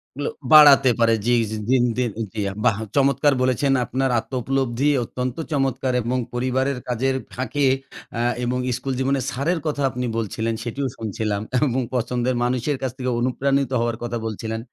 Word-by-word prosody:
এগুলো 145 - -2 0.2
বাড়াতে 140 -3 +9
পারে 115 -1 +4
জী, 120 - +2 0.4
দিনদিন 125 -2 +2 0.2
জী। 110 - -5 0.3
বাহ! 100 - +3 0.2
চমৎকার 140 +1 +3
বলেছেন। 130 +2 +2
আপনার 130 +3 -1
আত্মোপলব্ধি 130 +2 -1
অত্যন্ত 125 +1 -4 0.2
চমৎকার 135 -2 0
এবং 125 +3 -1 0.2
পরিবারের 130 +2 0
কাজের 130 +2 0 0.2
ফাঁকে 130 +3 -1 0.5
আ - - +1 0.2
এবং 125 +1 0 0.2
স্কুল 135 +1 -3
জীবনে 135 +1 +1
স্যারের 160 +7 -1
কথা 145 -2 -1
আপনি 125 0 -3
বলছিলেন। 115 +1 -2
সেটিও 135 +3 -3
শুনছিলাম 105 -1 -2 0.3
এবং 130 +1 0
পছন্দের 125 +1 0
মানুষের 130 +3 0
কাছ 130 -2 -1
থেকে 130 -1 -2
অনুপ্রাণিত 135 +1 0
হওয়ার 115 -1 -1
কথা 120 0 -3
বলছিলেন। 110 +1 -4
125 Hz, 145 wpm, -22 LUFS, 120-135 Hz, 0.5 s, বাড়াতে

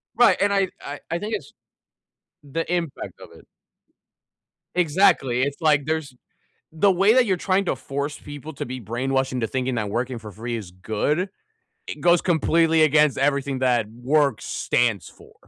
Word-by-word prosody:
Right, 240 -1 +5
and 200 0 +3
I 195 -2 +2
I 145 +1 -7
I 170 - -1
think 215 +3 -3
it's - - -8 0.9
the 155 +4 -4
impact 170 -5 -3
of - - -12
it. - - -20 1.3
Exactly, 150 -7 +3
it's, 140 +3 -3
like, 150 -3 +3
there's 155 -3 -2 0.6
the 175 +5 +3
way 195 +5 +4
that 255 -1 +5
you're 190 -3 +1
trying 190 +2 +1
to 170 - -1
force 140 +3 -4
people 145 +2 -9
to - - -5
be 130 +1 -6
brainwashed 130 +4 -1
into 125 -3 -1
thinking 130 +2 -2
that 105 -3 -2
working 120 +3 -2
for 110 -2 -10
free 115 +4 -5
is 100 -6 -7
good, 110 - -1 0.6
it - - -7
goes 175 -1 +4
completely 165 -1 +3
against 150 -1 +4
everything 140 -1 0
that 125 -4 +2
work 135 +1 +1
stands 115 -6 0
for. - - -18
145 Hz, 165 wpm, -23 LUFS, 125-170 Hz, 1.3 s, Right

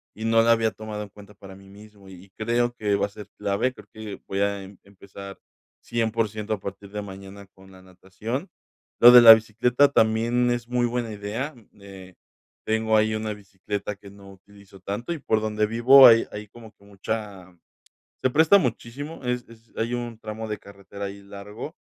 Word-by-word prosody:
y 110 - -6
no 115 0 +4
la 115 - +4
había 115 -1 0
tomado 105 -1 -7
en 105 - -11
cuenta 105 +1 -16
para 95 -1 -13
mí 95 0 -17
mismo, 100 -1 -16
y 95 +1 -15
creo 120 +2 0
que 105 -4 -1
va 100 - 0
a - - -17
ser 105 0 -12
clave, 100 +6 -1
creo - - -16
que 110 -2 -9
voy 95 - -3
a 100 -1 -1
empezar 100 0 -13 0.4
100% 110 -2 -2
a 105 - -4
partir 100 +1 -9
de 105 0 -5
mañana 100 0 -11
con 95 0 -18
la 95 0 -16
natación. 95 - -7 0.5
Lo 120 - +10
de 125 0 +10
la 115 -1 +12
bicicleta 115 +5 +2
también 120 +1 +2
es 120 -1 -3
muy 120 0 0
buena 120 -1 -3
idea. 110 +9 -5 0.2
Eh, 95 -2 -13 0.5
tengo 110 0 +1
ahí 110 0 +1
una 110 0 -3
bicicleta 100 +1 -6
que 100 0 -15
no 100 -1 -15
utilizo 100 0 -18
tanto, 105 - -4
y 165 - -7
por 110 -5 0
donde 110 0 -1
vivo 125 +5 +7
hay 115 -1 +5
hay 105 0 -8
como 115 0 -14
que - - -27
mucha 100 -2 -7 0.7
se 130 - +3
presta 160 +8 +5
muchísimo, 135 - -5
es 125 -1 -3
es 115 0 -19
hay 115 +2 -2
un 120 -2 -6
tramo 110 0 -7
de 105 - -4
carretera 100 0 -10
ahí 100 0 -8
largo. 105 - -9
105 Hz, 190 wpm, -24 LUFS, 100-115 Hz, 0.7 s, la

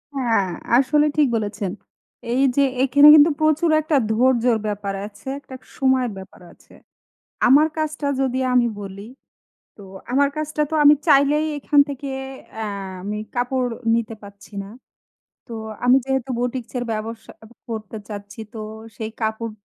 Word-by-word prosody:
হ্যাঁ, 230 -7 +1 0.3
আসলে 295 +3 +3
ঠিক 295 -3 +4
বলেছেন। 205 -3 -3 0.6
এই 265 +2 +2
যে 280 - +4 0.2
এখানে 285 +2 +6
কিন্তু 310 +1 +7
প্রচুর 310 +2 +2
একটা 305 -1 +1
ধৈর্যর 240 0 +3
ব্যাপার 200 -1 -3
আছে, 215 +5 -16
একটা 260 -2 -12 0.2
সময়ের 260 -3 +2
ব্যাপার 190 -1 -12
আছে। - - -23 0.7
আমার 290 +5 +6
কাজটা 310 -1 -2
যদি 260 -1 0
আমি 245 -1 +4
বলি, 200 +1 -8 0.7
তো 205 - -13 0.3
আমার 280 +2 +3
কাজটা 305 0 -2
তো - - -2
আমি 290 - +8
চাইলেই 290 +2 +4
এখান 290 +1 +3
থেকে 280 0 -6 0.5
আ - - -2 0.4
আমি 210 +2 -4 0.2
কাপড় 250 +1 0 0.3
নিতে 230 -1 -2
পারছি 200 +1 -14
না। 195 - -10 0.8
তো - - -12 0.3
আমি 250 - +6
যেহেতু 265 -1 -1
বুটিক্সের 245 0 -3
ব্যবসা 225 +1 -5
অ - - -12 0.2
করতে 220 -1 -6
চাচ্ছি 205 0 -9
তো 225 - -7 0.4
সেই 220 0 -5
কাপড় 220 +1 -2
250 Hz, 145 wpm, -21 LUFS, 220-285 Hz, 0.8 s, আমি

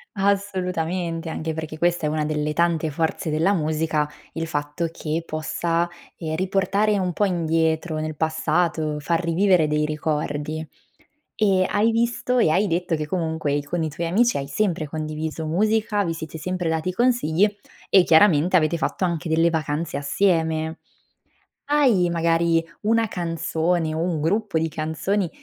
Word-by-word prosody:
Assolutamente, 180 -4 -1
anche 160 0 -3
perché 155 0 -6
questa 175 -1 +1
è - - 0
una 155 0 -1
delle 150 0 -1
tante 170 -1 +1
forze 160 +2 -2
della 160 +6 +2
musica, 155 -2 0 0.2
il 165 0 -3
fatto 150 +2 -2
che 160 +1 -3
possa, 165 +2 -1 0.3
ehm, 160 -2 -3
riportare 195 +3 +1
un 180 -2 -1
po' 205 - +1
indietro 160 -2 0
nel 155 0 -3
passato, 160 0 0
far 165 +3 0
rivivere 170 -1 +3
dei 150 0 +1
ricordi. 150 0 -2 0.7
E 195 -3 +3
hai 220 +3 +2
visto 235 +2 0
e 195 - +4
hai 195 +6 +2
detto 175 -1 0
che 150 -1 -4
comunque 160 -4 -1
i 145 0 0
con 170 +4 -3
i 160 - -1
tuoi 170 +3 -4
amici 230 +8 +3
hai 140 0 -4
sempre 165 -1 -1
condiviso 155 +1 -4
musica, 210 +4 +1
vi 165 -3 -2
siete 160 -1 -7
sempre 180 +1 -3
dati 160 +2 -1
consigli 205 -4 +2 0.4
e 190 - +6
chiaramente 170 0 +5
avete 160 0 +1
fatto 185 - -1
anche 170 -2 -2
delle 165 +1 +3
vacanze 155 -1 -2
assieme. 160 +1 0 0.9
Hai, 255 -12 +3
magari, 165 0 +2 0.2
una 225 +1 +2
canzone 165 -1 -1
o 160 - -2
un 165 -2 -1
gruppo 195 +2 0
di 160 - 0
canzoni 160 +5 -1
165 Hz, 155 wpm, -23 LUFS, 155-185 Hz, 0.9 s, e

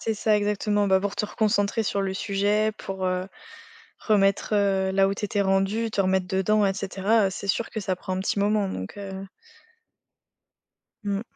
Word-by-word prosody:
C'est 225 - -1
ça, 215 0 +2
exactement. 205 0 0
Bah 190 0 +5
pour 200 0 -2
te - - 0
reconcentrer 210 +1 0
sur 200 - -1
le 190 -1 -2
sujet 205 +2 +1
pour, 190 -1 -5
heu, 185 0 -1 0.7
remettre, 200 -1 +2
heu, 195 -2 +2
là 195 0 +3
où - - 0
t'étais 205 0 -1
rendu, 195 +4 +1
te 205 - -3
remettre 190 -1 +1
dedans 200 +2 +2
et 195 - +1
cetera, 195 +2 +1
heu, - - -1
c'est 195 +1 -7
sûr 225 +4 0
que 220 - -4
ça 190 -1 -1
prend 185 0 -4
un - - -2
petit 200 - -1
moment, 205 -1 +1
donc 95 - -6
heu 195 -1 -6 1.8
Mmh. 200 0 -1
200 Hz, 185 wpm, -25 LUFS, 190-210 Hz, 1.8 s, Bah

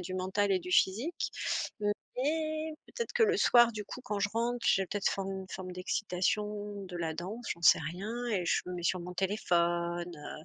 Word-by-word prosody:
du 185 +1 -4
mental 190 +2 +1
et 185 - +2
du 180 - -7
physique 225 - +2 0.5
mais 310 +9 -1
peut-être 470 -1 -4
que - - +4
le 430 -1 +4
soir 240 -7 +6
du 215 -1 -4
coup, 250 - -8
quand 210 -4 -2
je 205 - +2
rentre, 240 +2 +1
j'ai 195 - +4
peut-être 200 +1 0
forme 195 0 -2
une 190 -1 -6
forme 185 -1 -6
d'excitation 205 +2 -1
de 180 -2 -7
la 165 -2 -2
danse, 205 +9 -6
j'en 170 - -18
sais - - +8
rien 200 +10 -4
et 200 -7 0
je - - +2
me 180 - -4
mets 175 - -5
sur 180 +1 +1
mon 180 +1 -7
téléphone, 175 -3 0
heu, 155 0 -9
195 Hz, 200 wpm, -31 LUFS, 180-230 Hz, 0.5 s, sais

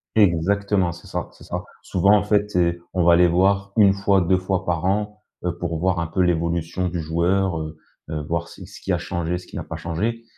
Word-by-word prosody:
Exactement, 100 0 +2
c'est 85 +1 -12
ça, - - -4
c'est - - -16
ça. - - -4 0.2
Souvent, 100 +3 +3
en 100 - 0
fait, 105 0 +1
et 85 -1 +2 0.2
on 90 -2 +1
va 85 -1 +7
les 90 0 +6
voir 100 +3 +2
1 100 -2 +6
fois 100 0 +2
2 90 +1 +2
fois 95 0 -2
par 85 -2 -1
an, 105 +2 -1 0.2
heu, 85 -1 -2
pour 85 -2 -3
voir 90 0 +1
un 85 - -1
peu 85 +4 -5
l'évolution 85 +1 0
du 85 0 -3
joueur, 85 +3 +1
heu. 80 0 -7 0.3
Heu, 75 -1 -3
voir 85 +3 -3
c - - -11
ce - - -13
qui - - -3
a - - +2
changé, 85 0 -2
ce 90 - -11
qui - - -8
a - - -4
pas - - -7
changé. 110 +8 -2
90 Hz, 230 wpm, -22 LUFS, 85-100 Hz, 0.3 s, va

